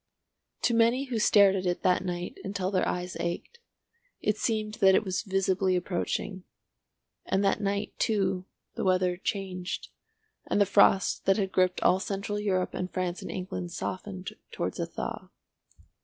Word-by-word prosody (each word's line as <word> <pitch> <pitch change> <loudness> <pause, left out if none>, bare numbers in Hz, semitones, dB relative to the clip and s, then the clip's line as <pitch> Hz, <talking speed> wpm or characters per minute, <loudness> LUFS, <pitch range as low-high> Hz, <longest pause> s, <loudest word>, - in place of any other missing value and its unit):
To 240 - +3
many 230 +3 +4
who 235 -3 -1
stared 200 -2 +6
at 185 -1 -1
it 175 - -1
that 180 0 +3
night 175 -1 -4
until 195 -1 -2
their 185 -2 +1
eyes 180 0 -3
ached, 175 - -4 0.6
it 210 - +1
seemed 215 -1 -1
that 190 -1 +7
it - - +3
was 185 -3 -1
visibly 190 -1 +1
approaching. 185 +1 -2 0.8
And 195 +1 +1
that 195 - +2
night, 200 +1 -1
too, 195 -5 +1 0.3
the - - -3
weather 185 -1 +2
changed, 185 -1 -4 0.6
and - - +1
the 205 - +6
frost 200 -1 +4
that 195 - +5
had 195 -3 -1
gripped 185 -1 +2
all 185 - +4
Central 200 +1 -3
Europe 190 -3 0
and 180 - -3
France 180 -1 -2
and - - -7
England 180 -2 -5
softened 185 0 -5 0.2
towards - - -3
a - - -1
thaw. - - -5
190 Hz, 160 wpm, -28 LUFS, 185-205 Hz, 0.8 s, that